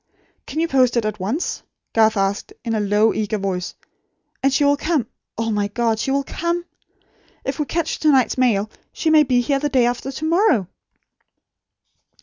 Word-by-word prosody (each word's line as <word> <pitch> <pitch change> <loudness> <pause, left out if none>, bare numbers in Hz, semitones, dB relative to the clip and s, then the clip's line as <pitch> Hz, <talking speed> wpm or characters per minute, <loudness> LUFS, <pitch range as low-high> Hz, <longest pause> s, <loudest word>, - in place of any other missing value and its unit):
"Can 305 - -4
you 335 - +1
post 255 -5 +3
it 230 - +1
at 215 -1 -3
once?" 220 - -2 0.3
Garth 220 -1 +3
asked, 195 +1 -1
in 230 - -1
a 220 - 0
low, 210 +2 +2
eager 215 0 -1
voice. 190 -3 -3 0.7
"And 275 - +3
she 270 - +2
will 285 0 +4
come 305 -3 0 0.3
oh, 225 0 -1
my 205 -1 0
God, 225 +1 0
she 270 - -2
will 275 +1 +1
come! 340 +4 -2 0.8
If 270 +2 -3
we 300 - 0
catch 330 +2 -2
to 310 - +4
night's 260 -5 +3
mail, 220 -5 +1 0.2
she 320 - 0
may 310 -1 +7
be 255 -4 +2
here 275 +3 0
the 295 +1 -1
day 255 -4 +3
after 245 +2 -2
to 310 +3 -5
morrow!" 335 - +3
245 Hz, 185 wpm, -21 LUFS, 215-290 Hz, 0.8 s, may